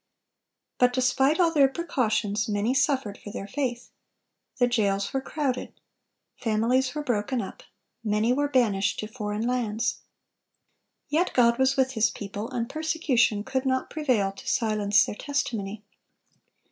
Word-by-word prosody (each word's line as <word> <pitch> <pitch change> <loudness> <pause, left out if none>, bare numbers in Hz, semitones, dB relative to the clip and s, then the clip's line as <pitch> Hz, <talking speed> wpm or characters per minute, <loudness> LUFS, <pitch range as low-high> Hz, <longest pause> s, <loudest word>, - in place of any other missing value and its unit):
But 250 0 +4
despite 265 +5 +2
all 340 -2 +4
their 280 -3 +6
precautions, 220 -9 -1
many 210 +4 +1
suffered 265 -7 0
for - - -9
their 200 - -6
faith. 245 +2 -3 0.7
The 245 - +4
jails 200 -5 0
were 270 - 0
crowded. 270 -3 -3 0.6
Families 250 +4 +1
were 300 - -2
broken 245 -1 -1
up. - - -6 0.4
Many 215 +2 +2
were 290 +2 +1
banished 215 -7 +1
to 215 - -5
foreign 215 -1 -4
lands. 235 -3 -1 1.1
Yet 320 +5 +1
God 235 -1 +4
was 265 +1 +3
with 260 -1 +2
His 225 -2 +2
people, 205 +2 -6
and 240 -3 -2
persecution 285 -9 +1
could 265 +2 -2
not 260 -1 -1
prevail 250 -11 +1
to 260 +7 -13
silence 215 -5 +3
their - - -5
testimony. 215 -6 -3
245 Hz, 140 wpm, -26 LUFS, 210-265 Hz, 1.1 s, their